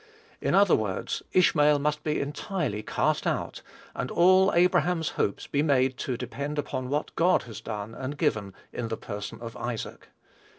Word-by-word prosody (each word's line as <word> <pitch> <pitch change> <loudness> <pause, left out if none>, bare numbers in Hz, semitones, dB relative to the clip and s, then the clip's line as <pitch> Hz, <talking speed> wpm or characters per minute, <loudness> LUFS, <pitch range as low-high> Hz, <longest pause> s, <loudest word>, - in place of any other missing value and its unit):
In - - +1
other 200 -2 +6
words, 105 -4 -2
Ishmael 150 -5 +4
must 150 +1 -1
be 150 -1 0
entirely 145 - -2
cast - - 0
out, - - -2 0.3
and 125 - -3
all 185 +2 +5
Abraham's 175 -1 +3
hopes 100 - -2
be 145 - 0
made 135 -3 +2
to 125 -3 -3
depend 140 +4 -4
upon 130 -3 -3
what 145 +2 -2
God 180 +2 +3
had 110 -4 -9
done 105 0 -5
and 130 +4 -5
given 105 - 0 0.2
in 120 - -3
the 110 0 -3
person 105 0 -6
of 115 -1 -7
Isaac. 120 -2 -5
140 Hz, 165 wpm, -27 LUFS, 115-155 Hz, 0.3 s, other